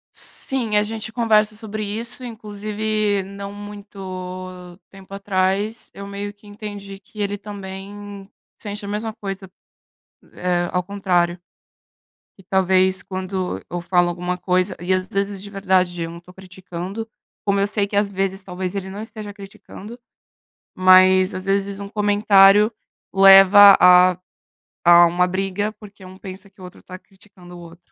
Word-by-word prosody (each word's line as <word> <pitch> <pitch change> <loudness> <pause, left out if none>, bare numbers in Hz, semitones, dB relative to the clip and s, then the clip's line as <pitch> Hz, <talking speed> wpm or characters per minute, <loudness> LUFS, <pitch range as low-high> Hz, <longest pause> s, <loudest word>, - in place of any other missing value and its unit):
Sim, 235 -6 -3
a 210 - +3
gente 215 0 -6
conversa 215 -2 +2
sobre 215 0 -6
isso. 225 +5 -4
Inclusive, 215 -2 -2
não 200 +1 -8
muito 185 -3 -9
tempo 195 0 -14
atrás, 200 +3 -1
eu 200 0 -9
meio 200 +1 -6
que 205 0 -20
entendi 205 -1 -9
que 210 +2 -10
ele 205 0 -2
também 200 0 -9 0.3
sente 205 0 -7
a - - -7
mesma 215 +2 -4
coisa, 195 -3 -7 0.8
eh, 175 -1 -1
ao 180 - 0
contrário. 180 -3 0 1.0
E 195 - -17
talvez 190 0 +2
quando 185 -1 -4
eu 175 - -4
falo 175 0 +2
alguma 180 +1 -3
coisa 185 +1 0
e 180 +2 -1
às 185 0 -1
vezes, 200 0 -3
de 200 - -10
verdade, 185 -3 0
eu 165 - -6
não 170 - -10
tô 175 +1 -17
criticando. 190 +3 -8 0.4
Como 200 -1 +1
eu 200 - +2
sei 205 0 -1
que 200 - -6
às 205 0 +1
vezes, 195 0 -2
talvez, 185 0 -5
ele 190 -1 -4
não 200 +2 -7
esteja 215 -2 -9
criticando. 200 +3 -12 0.8
Mas, 185 0 +5
às 185 0 -6
vezes, 195 0 -1
um 200 0 -7
comentário 205 0 +4 0.4
leva 195 +1 +9
a 180 0 +6 0.7
a 175 0 +8
uma 175 +1 +2
briga, 195 +3 -2
porque 205 -2 -14
um 185 0 -12
pensa 190 0 -10
que 195 - -30
o - - -12
outro 180 - -14
tá 185 0 -10
criticando 190 -2 -17
o - - -11
outro. 170 0 -13
195 Hz, 155 wpm, -21 LUFS, 185-205 Hz, 1.0 s, leva